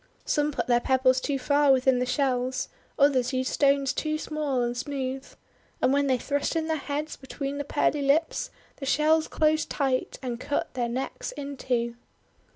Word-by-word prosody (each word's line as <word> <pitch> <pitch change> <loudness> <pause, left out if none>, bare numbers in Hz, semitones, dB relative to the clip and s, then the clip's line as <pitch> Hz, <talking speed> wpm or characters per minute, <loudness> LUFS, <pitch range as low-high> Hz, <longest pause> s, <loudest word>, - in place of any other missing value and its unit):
Some 295 0 +1
put - - -2
their 240 -1 +3
pebbles 260 0 +3
too 280 0 -1
far 285 +2 +3
within 260 -1 +4
the 250 - 0
shells, 255 -1 0 0.3
others 265 -3 +3
used 255 0 -1
stones 275 -1 +3
too 310 0 -1
small 300 -5 -1
and 240 0 -1
smooth. 265 0 -4 0.5
And 260 - +3
when 285 0 +2
they 260 -1 +3
thrust 285 +5 -1
in 325 -1 0
their 320 0 0
heads 295 +1 -4
between 275 +1 -5
the - - -1
pearly 290 +1 +1
lips, 285 +4 +1 0.3
the 275 - -6
shells 310 +3 +3
closed 310 0 +1
tight 265 -3 -1
and 240 -2 -3
cut 285 +3 -2
their 240 -2 -1
necks 270 - -4
in 285 - -6
two. 235 -2 -1
275 Hz, 175 wpm, -27 LUFS, 255-295 Hz, 0.5 s, within